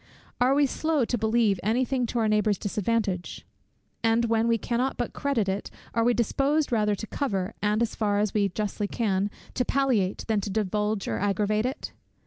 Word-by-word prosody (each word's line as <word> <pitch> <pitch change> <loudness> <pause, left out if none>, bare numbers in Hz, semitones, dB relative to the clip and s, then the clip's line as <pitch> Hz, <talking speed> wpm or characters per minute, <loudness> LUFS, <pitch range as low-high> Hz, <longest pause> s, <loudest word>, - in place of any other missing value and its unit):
Are 255 +2 +4
we 290 0 +4
slow 305 -1 0
to 245 - -1
believe 220 -3 +2
any 230 +5 +1
thing 250 -1 -1
to 240 - -3
our 225 -2 +2
neighbour's 210 -1 +2
disadvantage? 205 -3 -2 0.6
and 225 +1 +3
when 225 0 +2
we 230 -1 +3
cannot 240 +4 -1
but 245 - -3
credit 265 -8 0
it, 195 +1 -2 0.2
are 230 - +2
we 240 +1 +3
disposed 280 +6 +1
rather 210 -3 +2
to 220 - -6
cover, 200 -6 -2
and 210 +2 +2
as 230 - -2
far 205 -2 0
as 205 -1 0
we 205 -2 +2
justly 205 +2 -2
can, 200 -3 0 0.2
to 250 - +1
palliate, 250 -9 +1
than 220 -2 +1
to 200 - -4
divulge 210 +1 -1
or - - -1
aggravate 210 +3 +1
it? 265 - -5
220 Hz, 190 wpm, -26 LUFS, 205-240 Hz, 0.6 s, Are